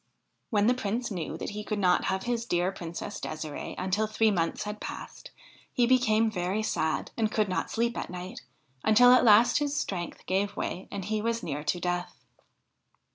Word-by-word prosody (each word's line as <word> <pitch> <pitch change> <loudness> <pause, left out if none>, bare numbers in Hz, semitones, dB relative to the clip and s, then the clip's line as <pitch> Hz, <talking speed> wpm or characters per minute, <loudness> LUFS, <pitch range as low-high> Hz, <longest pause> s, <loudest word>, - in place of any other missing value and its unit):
When 210 -3 +2
the 245 - +5
Prince 235 0 -2
knew 165 -4 -4
that - - -5
he 210 +1 -5
could 210 0 -3
not 180 -3 +3
have 190 0 -1
his 235 -1 -2
dear 175 0 +1
Princess 175 +2 -6
De"sire"e 155 -1 -5
until 190 +4 0
three 215 0 +2
months 165 -4 -1
had 210 0 -6
passed, - - -8 0.4
he 245 - +3
became 225 -3 +3
very 190 +2 -1
sad, 160 -6 -1
and 220 -2 0
could 215 -1 +1
not 185 - -2
sleep 235 +1 0
at - - -5
night, 180 +1 -7 0.4
until 245 +3 +7
at 255 - +6
last 225 +3 +6
his 290 -1 -1
strength 175 -3 -4
gave 200 +2 0
way 185 - -3
and 200 -2 -5
he 215 +1 -1
was 230 +1 -1
near 145 -1 -3
to 175 - 0
death. 175 0 -2
210 Hz, 185 wpm, -28 LUFS, 180-225 Hz, 0.4 s, until